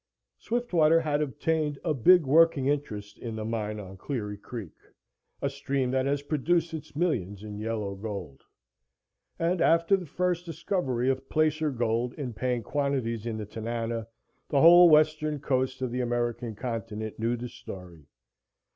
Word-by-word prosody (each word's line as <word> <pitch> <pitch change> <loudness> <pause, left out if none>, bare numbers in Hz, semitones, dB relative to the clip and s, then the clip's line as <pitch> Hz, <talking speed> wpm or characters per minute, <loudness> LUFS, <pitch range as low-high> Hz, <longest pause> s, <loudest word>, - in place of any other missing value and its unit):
Swiftwater 175 -10 +2
had 150 -2 0
obtained 150 +2 -1
a 160 - +1
big 165 +5 +5
working 150 -1 +4
interest 120 -8 -2
in 115 -2 -5
the 110 -1 -4
mine 110 -2 -3
on 95 -2 -9
Cleary 105 -2 -4
Creek, 105 -3 -8 0.7
a - - +2
stream 140 -2 -1
that 130 0 +1
has 140 0 0
produced 165 +3 0
its 155 -2 -7
millions 105 - -1
in 105 -1 -7
yellow 110 -2 -3
gold. 95 -9 -6 1.0
And, 170 +1 0
after 170 +4 +4
the 185 -3 -5
first 180 +2 -1
discovery 165 -7 -2
of 135 0 -5
placer 155 0 +2
gold 120 -1 -1
in 130 -5 -5
paying 125 +1 -1
quantities 125 -5 -1
in 110 -2 -3
the 110 - -4
Tanana, 115 +1 -4 0.4
the 140 - +2
whole 175 +1 +9
Western 155 -1 +3
coast 130 -1 -1
of 125 - -2
the 125 +1 -1
American 120 -1 -2
continent 110 -2 -5
knew 115 +2 0
the 120 +1 -5
story. 90 -9 -11
130 Hz, 155 wpm, -28 LUFS, 110-155 Hz, 1.0 s, whole